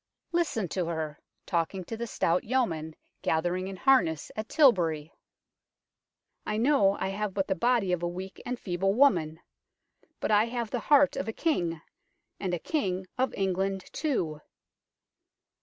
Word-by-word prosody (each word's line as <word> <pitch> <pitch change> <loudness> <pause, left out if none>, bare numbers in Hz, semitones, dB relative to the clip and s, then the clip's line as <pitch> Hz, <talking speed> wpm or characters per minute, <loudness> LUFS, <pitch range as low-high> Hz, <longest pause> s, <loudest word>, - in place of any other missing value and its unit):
Listen 330 - 0
to 180 -1 -2
her, 160 -3 -3 0.3
talking 180 +1 -1
to 225 - -6
the 235 +1 -4
stout 175 -4 +1
yeomen 165 -11 -1 0.3
gathering 175 +3 0
in 195 - -5
harness 185 - +2
at 215 +1 -5
Tilbury: 165 - +3 1.3
"I 215 - -2
know 220 -5 +3
I - - -1
have 200 0 -3
but 195 -1 0
the 190 - +2
body 235 -2 +2
of 180 -1 0
a 175 - 0
weak 185 +2 -7
and 250 0 -4
feeble 195 +1 0
woman; 170 - +3 0.8
but - - -1
I 210 +1 +5
have 235 -2 -4
the 245 - -1
heart 285 +4 +4
of 190 - -2
a 225 - -2
King, 175 - 0 0.6
and 190 - -2
a - - -2
King 190 - -2
of 260 - +2
England 195 0 -1
too 170 - -1
195 Hz, 155 wpm, -28 LUFS, 175-235 Hz, 1.3 s, I